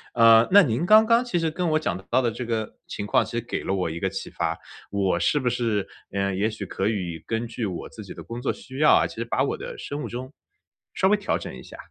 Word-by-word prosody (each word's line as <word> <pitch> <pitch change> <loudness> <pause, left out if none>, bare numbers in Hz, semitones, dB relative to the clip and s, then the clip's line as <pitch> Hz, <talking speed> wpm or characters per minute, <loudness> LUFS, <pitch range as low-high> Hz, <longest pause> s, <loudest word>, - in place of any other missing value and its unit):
呃， 115 -1 +7
那 200 0 +8
您 120 +2 0
刚 215 +3 +7
刚 230 +2 +4
其 240 -8 -2
实 165 -2 0
跟 175 +1 -1
我 155 0 +2
讲 85 - -1
到 130 +2 +3
的 120 - +1
这 125 - -5
个 110 -2 -3
情 105 - -5
况， 105 - +3
其 - - -9
实 120 - 0
给 120 - -4
了 - - -2
我 90 -4 0
一 85 +1 -5
个 95 - 0
启 95 - -6
发， - - -2 0.3
我 95 -3 0
是 145 - +2
不 130 - -2
是， 110 -5 -1 0.2
呃， 100 -1 -1
也 105 +3 +1
许 110 -2 -6
可 95 +2 -2
以 90 -6 -3
根 115 +1 -1
据 115 0 -4
我 90 -3 -5
自 - - -10
己 - - -9
的 - - -9
工 120 +1 -7
作 - - 0
需 130 +1 -9
要 150 0 +6
啊， - - +5
其 - - -12
实 115 +1 -3
把 130 +3 0
我 140 - -1
的 - - -8
生 145 +1 -5
物 - - -5
钟 130 +4 -7 0.6
稍 190 - +3
微 205 - +5
调 205 - -1
整 - - -7
一 - - -10
下。 - - -12
115 Hz, 295 characters per minute, -25 LUFS, 100-150 Hz, 0.6 s, 那